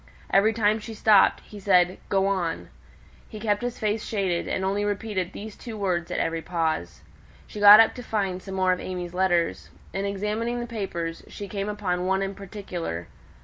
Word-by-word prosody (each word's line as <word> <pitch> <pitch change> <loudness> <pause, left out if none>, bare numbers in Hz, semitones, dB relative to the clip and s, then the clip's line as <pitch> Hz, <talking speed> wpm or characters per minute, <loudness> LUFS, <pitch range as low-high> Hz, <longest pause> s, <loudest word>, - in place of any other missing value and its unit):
Every 205 +3 +5
time 215 -1 +2
she 225 +1 -8
stopped, 210 -2 +5
he 210 - -12
said, 185 -2 +3
"Go 195 -1 +2
on." 185 -4 -1 0.6
He 215 - -8
kept 210 -1 0
his 245 0 -3
face 215 0 -1
shaded, 190 -5 -1
and 190 - -1
only 200 +2 0
repeated 205 -3 -2
those 215 0 -8
two 230 -3 -8
words 180 -4 -1
at - - -3
every 165 0 -1
pause. 160 - -2 0.4
She 210 - -9
got 205 +1 +10
up 225 - +6
to 250 - -8
find 195 -5 -2
some 190 0 -7
more 185 -1 +2
of 180 - -4
AimÄe's 180 -1 -5
letters. 170 - +1 0.2
In 195 - -2
examining 210 +4 -2
the 240 - -3
papers, 180 -8 -4
she 205 - -8
came 200 +1 -3
upon 185 -4 -2
one 190 +1 +1
in 195 0 -3
particular. 180 - -6
195 Hz, 190 wpm, -25 LUFS, 180-210 Hz, 0.6 s, got